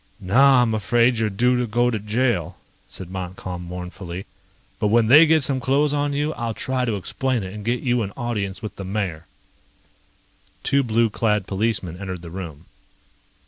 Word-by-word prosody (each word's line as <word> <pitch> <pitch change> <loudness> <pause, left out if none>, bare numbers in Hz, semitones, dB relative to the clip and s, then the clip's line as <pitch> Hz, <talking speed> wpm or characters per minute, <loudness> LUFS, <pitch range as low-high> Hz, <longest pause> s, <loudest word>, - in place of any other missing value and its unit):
"Now 125 +7 +5
I'm 115 -2 0
afraid 120 +3 +2
you're 110 -1 +1
due 125 +6 +2
to 125 - -1
go 120 +3 +2
to 110 - -2
jail," 110 -4 -1 0.3
said 90 -1 -8
Montcalm 90 -1 -6
mournfully. 90 +1 -7 0.5
"But 105 - +1
when 115 +2 +4
they 150 +6 +8
get 160 -1 +4
some 130 0 +1
clothes 140 +3 +2
on 145 0 0
you, 145 +2 -1
I'll 115 -2 -4
try 130 -1 -1
to 115 -3 -1
explain 125 +4 -1
it 95 0 -7
and 105 -1 -7
get 120 +3 -1
you 125 -2 +1
an 100 -2 -3
audience 105 -5 -3
with 110 - -6
the 100 - -6
mayor." 95 -5 -3 1.4
Two 140 - +2
blue 115 -2 +1
clad 105 -3 0
policemen 95 -4 -1
entered 95 -3 -6
the 85 - -9
room. 85 -4 -8
110 Hz, 180 wpm, -22 LUFS, 95-125 Hz, 1.4 s, they